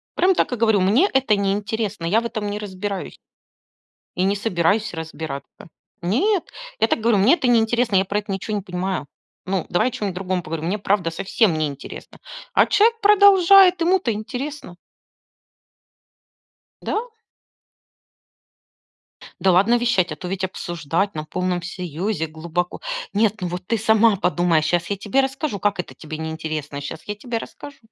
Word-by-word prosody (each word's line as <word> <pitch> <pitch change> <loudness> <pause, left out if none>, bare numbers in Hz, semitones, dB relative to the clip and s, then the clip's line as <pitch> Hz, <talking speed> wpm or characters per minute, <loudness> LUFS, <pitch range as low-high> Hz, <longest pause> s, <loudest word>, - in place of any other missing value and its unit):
Прям 380 +1 +4
так - - 0
и - - +1
говорю: 220 -3 +3
мне 230 - +3
это 265 -5 +3
неинтересно, 200 -1 -2
я 210 +7 +2
в - - -7
этом 220 -3 -3
не 205 - -3
разбираюсь. 200 -1 -5 1.0
И 180 - +1
не 195 +2 +2
собираюсь 200 +1 0
разбираться. 160 -4 -7 0.3
Нет, 330 - +1 0.4
я 225 - +3
так - - 0
и - - -9
говорю, 230 -1 +3
мне 205 +9 +5
это 265 - -1
неинтересно, 235 -2 +2
я 190 - +2
про 200 +2 -1
это 205 -1 -7
ничего 195 +2 -3
не 205 - -2
понимаю. 180 -3 -3 0.4
Ну, 190 -2 -1
давай 175 +8 +2
о - - -13
чем-нибудь 200 -5 -4
другом 185 -1 -2
поговорим, 160 0 -5
мне 205 +4 -1
правда 195 -4 0
совсем 195 +2 +1
неинтересно. 145 -3 -6 0.4
А - - +5
человек 455 +2 +3
продолжает, 390 -2 +6
ему-то 360 -5 +2
интересно. 245 - -6 2.1
Да. 440 +3 -2 2.3
Да 190 - +3
ладно 200 +7 +4
вещать, 230 -8 +1
а - - -8
то 180 +4 -8
ведь 190 0 -2
обсуждать 175 +1 -2
на 155 -1 -5
полном 180 +2 -2
серьезе 180 +1 -3
глубоко. 170 +3 -4 0.3
"Нет, 210 0 +1
ну 180 - -1
вот 180 +1 -6
ты 230 - +1
сама 220 0 +4
подумай, 175 -3 +2
сейчас 170 +2 0
я 200 - 0
тебе 210 +7 0
расскажу, 270 -4 -3
как 205 -1 0
это 180 - -5
тебе 155 -1 -8
неинтересно, 155 -2 -5
а - - -5
сейчас 155 +3 -7
я 210 - -5
тебе 230 +3 -4
расскажу". 280 +4 -9
200 Hz, 165 wpm, -22 LUFS, 175-230 Hz, 2.3 s, продолжает